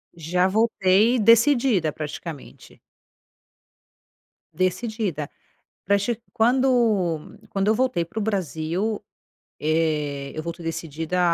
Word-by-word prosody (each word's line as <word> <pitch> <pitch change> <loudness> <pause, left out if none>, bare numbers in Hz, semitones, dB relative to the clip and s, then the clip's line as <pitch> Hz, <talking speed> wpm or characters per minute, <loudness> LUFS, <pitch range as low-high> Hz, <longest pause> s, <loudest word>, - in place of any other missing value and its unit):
Já 175 +3 +1
voltei 215 +2 +3
decidida, 230 - +4
praticamente. 155 0 -8 1.7
Decidida, 185 -4 -2 0.6
pra 200 +2 +3
che 215 +3 -2
quando 225 -9 +2
quando 195 0 -1
eu 215 - +4
voltei 250 -8 0
pro 215 +6 -5
Brasil, 195 +1 -2 0.6
eh, 150 -3 -1
eu 155 - -3
voltei 170 0 -6
decidida 165 +2 -3
185 Hz, 90 wpm, -24 LUFS, 160-220 Hz, 1.7 s, decidida